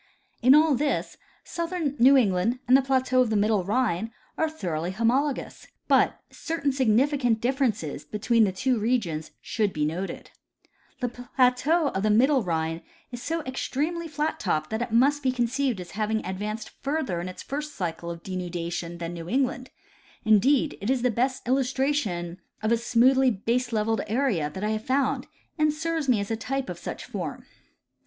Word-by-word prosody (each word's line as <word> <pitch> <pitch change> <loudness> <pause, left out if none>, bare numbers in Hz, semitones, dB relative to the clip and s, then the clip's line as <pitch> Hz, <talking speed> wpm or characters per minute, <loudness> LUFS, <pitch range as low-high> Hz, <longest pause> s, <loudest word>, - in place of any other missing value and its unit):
In 255 +3 +7
all 310 0 +5
this, 285 +3 -1 0.3
southern 335 -4 -3
New 270 +3 +7
England 205 0 +2
and 255 - +6
the 270 - +6
plateau 260 -1 +2
of 250 - +2
the 220 - 0
middle 205 -1 +2
Rhine 220 0 0 0.2
are 320 - +1
thoroughly 175 - -3
homologous, 245 +8 -1 0.2
but - - +3
certain 320 -4 -2
significant 260 -1 +2
diff'erences 230 - -1
between 225 +2 +2
the 200 - +2
two 250 +5 0
regions 205 -9 -1
should 210 -3 -1
be 150 -3 -1
noted: 175 +6 -4 0.7
The 250 - 0
plateau 255 +6 +2
of 190 - -2
the 215 - +1
middle 260 +6 +4
Rhine 165 -3 -2 0.3
is 245 -1 -7
so 330 +3 -2
extremel}^ 305 +6 -2
flat 305 +1 -2
topped 155 -6 -1
that 220 +1 -1
it 245 -1 -3
must 275 +6 +3
be 260 -2 +1
conceived 250 -1 0
as 180 -1 -8
having 220 +1 -1
advanced 210 +4 -4
further 275 - -1
in 180 - -5
its 185 - -9
first 300 +2 -5
cycle 170 -2 -4
of 170 0 -7
denudation 175 -2 -4
than 170 0 -5
New 170 0 -7
England; 260 +2 0 0.6
indeed, 250 +8 +3
it 200 - -2
is 260 -2 +1
the 250 - +3
best 255 +3 -1
illustration 250 -9 0 0.2
of 220 - +1
a 235 - +4
smoothly 255 +3 +4
baselevelled" 225 0 0
area, 215 - 0
that 190 +6 -7
I 210 - 0
have 215 0 -2
found, 265 +3 0 0.3
and 305 0 +4
serves 320 -1 -2
me 235 -4 +4
as 200 +2 -4
a - - +1
type 265 +4 -3
of - - -8
such - - -6
a - - -25
form. - - -5
240 Hz, 175 wpm, -26 LUFS, 195-270 Hz, 0.7 s, In